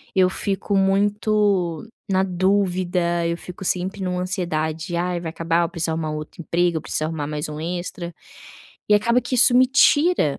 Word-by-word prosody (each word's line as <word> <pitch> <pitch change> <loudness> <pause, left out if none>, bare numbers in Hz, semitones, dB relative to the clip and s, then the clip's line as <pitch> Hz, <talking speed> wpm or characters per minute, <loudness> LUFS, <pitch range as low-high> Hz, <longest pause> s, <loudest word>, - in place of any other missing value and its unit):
eu 185 -1 +4
fico 200 +1 -2
muito 200 -2 +1 0.2
na 190 -1 +2
dúvida, 180 -2 0
eu 170 - -2
fico 180 +1 -9
sempre 190 +3 -1
em - - -1
uma 180 0 -2
ansiedade: 170 -3 -3
"Ai, 175 0 -1
vai 165 -2 -5
acabar, 165 +1 0
eu 170 - -2
preciso 165 -2 -2
arrumar 160 -1 -3
um 155 - -3
outro 155 +2 -9
emprego, 170 0 0
eu - - -4
preciso 155 - -2
arrumar 155 -2 -3
mais 150 0 -4
um 150 0 -6
extra", 175 +1 -5 0.8
e 210 - +5
acaba 235 +4 +3
que 245 +2 -4
isso 245 0 +6
me 255 +1 +6
tira, 280 - +3
180 Hz, 185 wpm, -22 LUFS, 165-195 Hz, 0.8 s, isso